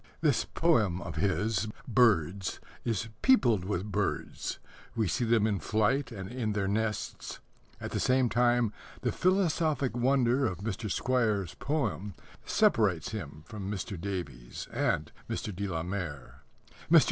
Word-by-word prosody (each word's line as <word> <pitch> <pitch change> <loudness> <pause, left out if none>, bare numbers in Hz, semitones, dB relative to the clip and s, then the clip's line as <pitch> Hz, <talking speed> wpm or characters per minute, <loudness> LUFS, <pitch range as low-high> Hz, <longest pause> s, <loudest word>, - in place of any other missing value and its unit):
This 150 -6 +3
poem 110 - +2
of 85 -4 -6
his, 100 +3 +1 0.2
Birds, 100 - +2 0.2
is 115 -1 -1
peopled 120 - +4
with 100 +1 -2
birds. - - -2 0.4
We 110 -3 +1
see 120 +8 0
them 115 -2 +3
in 105 -3 +1
flight 110 +6 +1
and 95 -4 -6
in 115 -2 -2
their 100 -2 0
nests. 110 +2 -2 0.4
At - - -5
the - - -1
same 130 0 +3
time, 120 -2 +2 0.3
the - - +1
philosophic 165 - +1
wonder 130 +1 +3
of 95 -5 -3
Mr. 105 +1 -4
Squire's 110 -7 +1
poem 135 - -2 0.3
separates 110 - +2
him 75 -8 -6
from 100 0 -6
Mr. 100 -1 -3
Davies 70 -12 -5
and - - 0 0.2
Mr. 105 - -3
de 100 +2 -2
la 80 -3 -2
Mare. 85 -7 -5 0.5
Mr. - - +9
110 Hz, 140 wpm, -30 LUFS, 95-125 Hz, 0.5 s, Mr